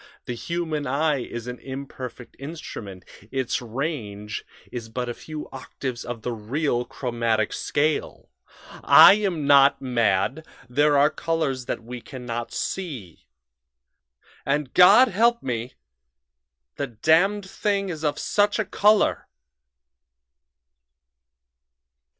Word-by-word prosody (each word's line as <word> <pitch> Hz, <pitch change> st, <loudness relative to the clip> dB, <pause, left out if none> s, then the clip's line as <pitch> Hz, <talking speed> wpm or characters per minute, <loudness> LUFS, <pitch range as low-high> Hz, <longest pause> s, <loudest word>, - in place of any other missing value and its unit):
The 125 Hz, -, -4 dB
human 155 Hz, +3 st, -3 dB
eye 145 Hz, +2 st, +1 dB
is 120 Hz, -1 st, -6 dB
an 125 Hz, 0 st, -6 dB
imperfect 130 Hz, -2 st, -8 dB
instrument; 120 Hz, -, -8 dB, 0.3 s
its 130 Hz, -2 st, -1 dB
range 110 Hz, -5 st, -4 dB, 0.3 s
is 115 Hz, -2 st, -6 dB
but 125 Hz, +2 st, -3 dB
a -, -, -3 dB
few 155 Hz, +4 st, -8 dB
octaves 130 Hz, -1 st, -6 dB
of 120 Hz, -2 st, -7 dB
the 125 Hz, -, -2 dB
real 120 Hz, +3 st, -1 dB
'chromatic 115 Hz, -3 st, -1 dB
scale' 150 Hz, +1 st, -2 dB, 0.5 s
I -, -, +9 dB
am 190 Hz, -8 st, -1 dB
not 140 Hz, -1 st, +6 dB
mad; 120 Hz, +2 st, 0 dB, 0.2 s
there 145 Hz, +3 st, +3 dB
are 145 Hz, +2 st, +4 dB
colors 150 Hz, -6 st, -2 dB
that 115 Hz, -, -3 dB
we 120 Hz, +1 st, -8 dB
can 130 Hz, -1 st, -10 dB
not 120 Hz, 0 st, -4 dB
see. 135 Hz, -, -5 dB, 1.2 s
"And, 145 Hz, -1 st, -1 dB
God 235 Hz, +8 st, +7 dB
help 235 Hz, +4 st, +2 dB
me! 120 Hz, -1 st, -4 dB, 1.0 s
the 140 Hz, -, -2 dB
Damned 170 Hz, -, +2 dB
Thing 200 Hz, 0 st, -1 dB
is 160 Hz, -3 st, -6 dB
of 150 Hz, -1 st, 0 dB
such 205 Hz, 0 st, +1 dB
a 220 Hz, -, 0 dB
color!" 210 Hz, +1 st, +2 dB
135 Hz, 115 wpm, -24 LUFS, 120-160 Hz, 1.2 s, I